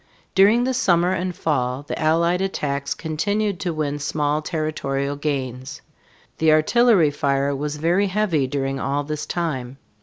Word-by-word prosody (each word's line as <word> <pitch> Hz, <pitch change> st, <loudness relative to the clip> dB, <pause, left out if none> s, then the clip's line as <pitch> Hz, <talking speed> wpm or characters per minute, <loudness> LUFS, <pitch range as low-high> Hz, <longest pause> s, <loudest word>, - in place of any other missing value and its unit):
During 205 Hz, +5 st, +5 dB
the 260 Hz, +1 st, 0 dB
summer 180 Hz, -7 st, +2 dB
and 180 Hz, -1 st, -2 dB
fall 135 Hz, -7 st, -1 dB
the -, -, -5 dB
Allied 170 Hz, +3 st, +2 dB
attacks 140 Hz, -7 st, -2 dB
continued 200 Hz, +5 st, -1 dB
to 180 Hz, -, -2 dB
win 150 Hz, -2 st, -2 dB
small 150 Hz, 0 st, -1 dB
territorial 145 Hz, -3 st, -2 dB
gains. 135 Hz, -1 st, -4 dB, 0.6 s
The 160 Hz, -1 st, +4 dB
artillery 200 Hz, 0 st, +4 dB
fire 140 Hz, -1 st, 0 dB
was 145 Hz, +2 st, -3 dB
very 175 Hz, +6 st, +1 dB
heavy 185 Hz, -8 st, 0 dB
during 135 Hz, 0 st, -2 dB
all 140 Hz, +2 st, -1 dB
this 150 Hz, +1 st, -5 dB
time. 135 Hz, -7 st, -3 dB
155 Hz, 145 wpm, -22 LUFS, 140-180 Hz, 0.6 s, During